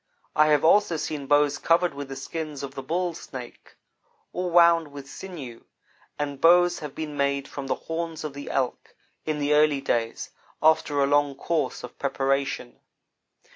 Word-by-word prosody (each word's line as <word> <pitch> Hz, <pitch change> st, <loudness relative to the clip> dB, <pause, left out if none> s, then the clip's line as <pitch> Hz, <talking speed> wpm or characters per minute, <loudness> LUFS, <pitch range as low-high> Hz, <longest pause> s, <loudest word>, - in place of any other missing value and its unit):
I 155 Hz, 0 st, +5 dB
have 150 Hz, 0 st, +3 dB
also 175 Hz, -1 st, +4 dB
seen 150 Hz, -2 st, -4 dB
bows 145 Hz, 0 st, +3 dB
covered 170 Hz, 0 st, +2 dB
with 140 Hz, -1 st, -7 dB
the 135 Hz, -, -6 dB
skins 150 Hz, +1 st, -5 dB
of 135 Hz, -1 st, -6 dB
the 135 Hz, -, -6 dB
bull 175 Hz, +5 st, -1 dB
snake, 130 Hz, -6 st, -10 dB, 0.6 s
or 180 Hz, 0 st, -2 dB
wound 170 Hz, -2 st, +5 dB
with 140 Hz, -1 st, -9 dB
sinew, 135 Hz, -8 st, -9 dB, 0.5 s
and 145 Hz, -2 st, -4 dB
bows 175 Hz, +1 st, +5 dB
have 150 Hz, -3 st, -7 dB
been 155 Hz, -2 st, -5 dB
made 140 Hz, -1 st, 0 dB
from 140 Hz, -1 st, -7 dB
the -, -, 0 dB
horns 165 Hz, -1 st, -4 dB
of 150 Hz, -2 st, -5 dB
the 140 Hz, 0 st, -8 dB
elk, 130 Hz, -2 st, -2 dB, 0.3 s
in 155 Hz, -1 st, 0 dB
the 145 Hz, 0 st, +1 dB
early 150 Hz, -1 st, +4 dB
days, 115 Hz, -4 st, -2 dB, 0.3 s
after 150 Hz, -2 st, +3 dB
a -, -, +4 dB
long 145 Hz, 0 st, +2 dB
course 155 Hz, -3 st, -2 dB
of 125 Hz, -, -10 dB
preparation. 135 Hz, -2 st, -1 dB
145 Hz, 170 wpm, -25 LUFS, 140-165 Hz, 0.6 s, I